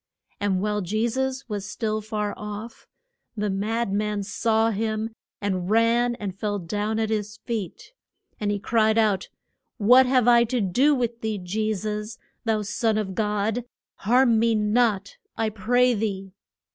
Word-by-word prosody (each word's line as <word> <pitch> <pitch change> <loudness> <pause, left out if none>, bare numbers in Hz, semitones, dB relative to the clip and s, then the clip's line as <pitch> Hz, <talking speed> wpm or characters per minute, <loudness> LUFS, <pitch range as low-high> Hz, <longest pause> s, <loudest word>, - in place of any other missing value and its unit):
And 195 -2 0
while 210 0 0
Je 215 +5 0
sus 265 +2 -2
was 205 -3 -4
still 215 0 -2
far 210 -1 -3
off, 210 +2 -8 0.5
the 210 -1 0
mad 215 +2 -1
man 210 0 -1
saw 220 +3 +1
him 220 +1 -2 0.3
and 185 -3 -2
ran 230 +2 +3
and 205 -6 -5
fell 205 +1 -2
down 205 +4 -2
at 220 -1 0
his 210 -1 -2
feet. 225 - -5 0.5
And 210 - -1
he 205 - 0
cried 220 +1 +2
out, 210 -4 +2 0.5
What 250 +4 +6
have 255 -2 +3
I 235 -1 +7
to 245 +2 -1
do 250 +10 +3
with 235 -2 -2
thee, 220 -1 -2
Je 210 +4 -2
sus, 210 +2 -4 0.3
thou 220 -2 +1
Son 215 +2 0
of 200 -3 -2
God? 210 +3 -1 0.3
Harm 235 +1 +3
me 230 0 +3
not, 210 -2 +1 0.2
I 225 -1 +1
pray 245 +4 +2
thee. 195 -3 -3
215 Hz, 160 wpm, -25 LUFS, 205-230 Hz, 0.5 s, I